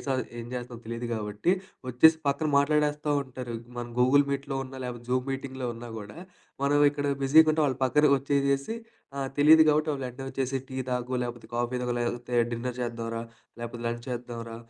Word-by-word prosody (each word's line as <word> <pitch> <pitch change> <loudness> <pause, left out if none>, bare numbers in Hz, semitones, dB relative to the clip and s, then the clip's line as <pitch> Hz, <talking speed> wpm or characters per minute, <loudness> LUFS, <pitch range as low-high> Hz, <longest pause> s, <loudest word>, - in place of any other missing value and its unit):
సది 130 -1 0 0.2
ఏం 115 - -7
జేస్తున్నామో 120 -1 -6
తెలీదు 115 +1 -4
గాబట్టి 105 - 0 0.4
వచ్చేసి 160 +6 +6
పక్కన 155 +3 0
మాట్లాడేస్తా 150 +1 +2
ఉంటారు. 125 -3 -6 0.2
మనం 120 0 -5
గూగుల్ 140 +3 +5
మీట్‍లో 140 0 -3
ఉన్నా, 135 0 -10
లేకపోతే 120 -1 -7
జూమ్ 130 +1 +1
మీటింగులో 135 -1 -4
ఉన్నా 120 0 -8
కూడా, 105 0 -10 0.5
మనం 145 +1 +3
ఇక్కడ 145 0 -3 0.2
బిజీగా 155 +4 +6
ఉంటాం 155 0 +2
వాళ్ళు 135 -1 -2
పక్కన 150 +3 +4
వచ్చేసేసి 140 - 0 0.4
ఆహ్, 135 -1 -1
తెలీదు 155 +2 +8
కాబట్టి 155 +1 +3
వాళ్ళు 135 -3 -3
ఎంటనే 125 +2 -8
వచ్చేసి 135 0 -1
"టీ 130 - -7
తాగు 125 0 -2
లేకపోతే, 120 -2 -6
కాఫీ 120 +1 -1
తాగు 125 -1 -1
లేకపోతే, 120 +1 -3 0.2
డిన్నర్ 120 +1 -3
చేద్దాం 115 -1 -3
రా 115 - -2 0.4
లేకపోతే, 120 0 -6
లంచ్ 120 0 -2
చేద్దాం 120 -1 -5
రా 115 - -6
130 Hz, 180 wpm, -28 LUFS, 120-140 Hz, 0.5 s, తెలీదు